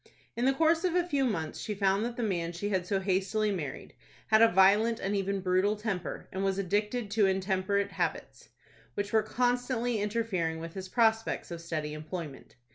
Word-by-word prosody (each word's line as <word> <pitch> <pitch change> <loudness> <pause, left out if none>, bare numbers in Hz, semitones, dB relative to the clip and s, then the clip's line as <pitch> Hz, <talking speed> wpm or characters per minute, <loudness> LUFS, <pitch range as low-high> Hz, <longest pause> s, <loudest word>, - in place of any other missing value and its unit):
In 240 - 0
the 270 - +4
course 325 +3 +3
of 360 -2 +1
a 355 -1 +2
few 280 -6 +1
months, 165 -10 -2
she 210 - -4
found 195 +1 +2
that 240 0 -5
the 240 - -1
man 175 -5 -1
she 205 +5 -3
had 185 -3 -1
so 195 0 +1
hastily 195 +3 0
married 155 -9 -5 0.4
had 220 0 +5
a 230 - +9
violent, 205 +5 +4
and 195 +2 -1
even 195 0 -1
brutal, 185 +3 +2
temper, 210 -4 -4
and 190 +1 -3
was 195 -1 0
addicted 210 +3 -1
to 205 -1 +3
intemperate 190 +1 0
habits, - - -4 0.5
which 205 +1 -3
were 220 - +5
constantly 245 0 0
interfering 205 -7 -1
with 165 0 -7
his 190 -1 -7
prospects 225 -3 +1
of 170 -1 -6
steady 155 -3 -4
employment. 155 -2 -7
200 Hz, 190 wpm, -30 LUFS, 185-225 Hz, 0.5 s, a